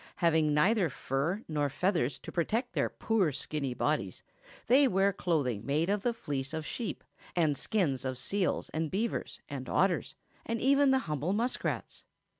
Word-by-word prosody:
Having 160 -3 +3
neither 190 +3 +3
fur 145 - -2
nor 150 -2 0
feathers 145 -5 0
to - - -9
protect 225 - -1
their - - +1
poor 205 -8 +1
skinny 140 -2 -3
bodies, 135 - -1 0.4
they 270 +4 +6
wear 195 -2 +3
clothing 140 - 0
made 155 +8 +1
of 205 0 0
the 240 - +1
fleece 145 - -4
of 160 -1 -4
sheep, 230 +4 -4 0.3
and 160 -5 +3
skins 145 - 0
of 130 -1 -3
seals 190 +8 -1
and 160 0 -2
beavers 220 +7 -2
and - - -6
otters - - +1 0.3
and 230 0 -2
even 280 +2 +4
the 265 - +5
humble 150 +4 -1
muskrats. 235 +4 -2
165 Hz, 160 wpm, -31 LUFS, 145-210 Hz, 0.4 s, they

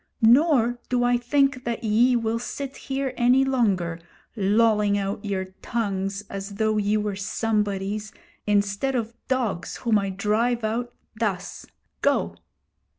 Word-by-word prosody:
Nor 245 -1 +4
do 245 -1 +1
I 245 0 +3
think 270 +1 +1
that 235 0 -3
ye 235 +4 +4
will 230 -1 0
sit 275 +3 -5
here 270 -1 -3
any 250 +2 +4
longer, 195 -11 0 0.4
lolling 210 0 +3
out 200 0 -3
your 195 -2 -2 0.2
tongues 200 -3 -2
as 200 0 -6
though 215 0 +1
ye 210 +1 +1
were 210 -1 -2
somebodies, 210 0 -1 0.4
instead 205 +6 +1
of 230 -1 -2
dogs 235 -9 -1
whom 225 -4 +2
I 195 -1 -2
drive 220 +5 0
out 235 +3 -2 0.3
thus! 195 -4 -3 0.3
Go!' - - +1
220 Hz, 135 wpm, -24 LUFS, 200-245 Hz, 0.4 s, Nor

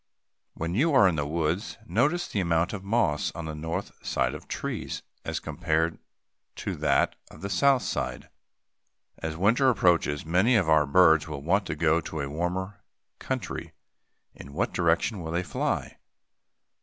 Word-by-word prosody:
When 85 +1 -3
you 145 - +2
are 100 -7 +7
in 90 - +2
the 75 -2 -1
woods, 80 +6 -1
notice 145 - +1
the 105 - -2
amount 85 0 +1
of 100 -2 -5
moss 100 -8 +1
on 85 - -5
the 80 - -4
north 80 +5 -4
side - - 0
of - - -9
trees - - -4 0.2
as - - -3
compared 80 +1 -1 0.6
to - - -4
that - - +2
on - - -14
the 100 +1 -4
south 135 +6 +4
side. - - -3 0.9
As 80 -1 -4
winter 115 +9 +4
approaches; 85 - +2
many 90 +10 +3
of 100 -7 +3
our 80 -2 +4
birds 80 0 +5
will 70 -3 -6
want 95 +5 +1
to - - -2
go 80 +1 +2
to 80 - -6
a 70 - -3
warmer 90 +5 -3 0.4
country; - - -4 0.6
in 70 - -12
what 90 - -1
direction 85 +4 +1
will 80 -1 -5
they 85 +1 0
fly? - - -2
85 Hz, 165 wpm, -27 LUFS, 80-100 Hz, 0.9 s, are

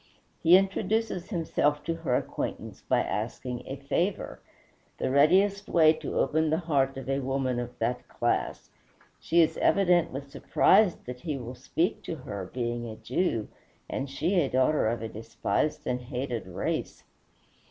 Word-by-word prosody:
He 170 +3 +8
introduces 195 0 -1
himself 150 -5 0
to 165 - -1
her 155 -7 0
acquaintance - - -4
by - - +1
asking 125 -1 -3
a 135 - -4
favor, 145 +8 -2 0.6
the - - -1
readiest 195 +8 +4
way 160 -2 +6
to 155 -2 -5
open 155 +3 +2
the 160 - +2
heart 135 -4 +1
of 135 - -7
a 135 0 0
woman 130 -2 -1
of 120 0 -6
that 120 +2 -2
class. - - -2 0.5
She 170 +1 +3
is 160 - -1
evidently 175 -7 +3
surprised 165 +7 +3
that 125 0 -7
he 155 -4 -3
will 125 -1 -6
speak 130 +7 -1
to 165 - -3
her, 100 - -7
being 120 -1 -3
a 110 - -7
Jew, 120 - -1 0.4
and 135 +1 -3
she 170 +7 +1
a 140 - 0
daughter 130 0 +2
of 115 0 -1
a - - -2
despised 115 +5 -2
and 125 0 -1
hated 125 -3 -4
race. 90 - -3
140 Hz, 155 wpm, -28 LUFS, 125-165 Hz, 0.6 s, He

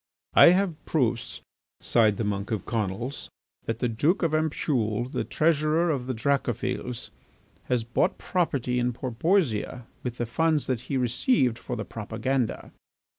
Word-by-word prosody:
"I - - +9
have 180 -3 +2
proofs," 120 -6 0 0.4
sighed 110 -4 +3
the - - -1
monk 100 -1 -2
of 110 -5 -2
Conils, 115 +4 -3 0.4
"that 115 - -2
the 125 - 0
Duke 145 - +1
of 165 -2 +1
Ampoule, 125 -7 0
the 130 - -2
treasurer 160 +1 +2
of 130 -4 -2
the 130 - -2
Dracophils, 125 -1 -2 0.5
has 125 -2 0
brought 120 +1 0
property 135 -9 0
in 125 0 0
Porpoisia 125 - 0 0.2
with 125 -1 -4
the 120 - -1
funds 155 +5 +1
that 125 -3 -1
he 135 - 0
received 125 - +2
for 125 - -5
the - - -4
propaganda." 115 +3 -2
125 Hz, 145 wpm, -26 LUFS, 115-155 Hz, 0.5 s, I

